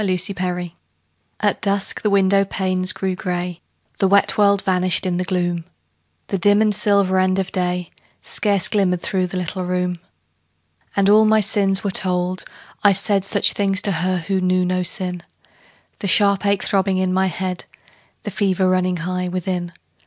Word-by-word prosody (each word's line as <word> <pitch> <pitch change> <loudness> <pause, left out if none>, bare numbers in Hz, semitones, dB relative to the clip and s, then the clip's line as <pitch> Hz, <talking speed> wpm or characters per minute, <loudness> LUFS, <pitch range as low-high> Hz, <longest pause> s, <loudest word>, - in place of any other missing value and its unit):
FORGIVENESS 180 -2 -1 0.7
At - - 0
dusk 200 -1 -1
the 210 - 0
window 195 0 +3
panes 185 -1 -1
grew 190 -1 -3
grey; 180 -1 -4 0.4
The 195 - +3
wet 200 +1 +3
world 200 -1 +3
vanished 185 0 +1
in 180 -1 -1
the 180 - -1
gloom; 175 -2 -2 0.7
The 195 - -1
dim 205 +3 +4
and 215 -1 +2
silver 200 -2 +2
end 185 0 +1
of 195 0 -2
day 180 -2 -2 0.3
Scarce 200 -3 0
glimmered 185 -4 0
through 185 -2 -1
the 185 - -5
little 185 +1 -3
room. 180 -1 -2 1.0
And 200 -1 +2
all 215 +2 +6
my 220 0 +4
sins 200 -2 +1
were 200 - -1
told; 180 0 -1 0.4
I 205 -1 +6
said 195 0 +1
Such 195 - +4
things 195 -2 +1
to 200 - +1
her 185 +1 -1
who 190 +2 -2
knew 185 0 +1
not 180 0 +1
sin 180 -3 -1 0.8
The 200 - -3
sharp 200 +1 +3
ache 200 -1 +1
throbbing 195 -1 0
in 185 0 0
my 190 +1 +2
head, 185 0 -4 0.6
The - - -5
fever 190 -2 0
running 185 -1 +1
high 180 +2 -3
within. 180 -1 -3
185 Hz, 165 wpm, -20 LUFS, 180-200 Hz, 1.0 s, all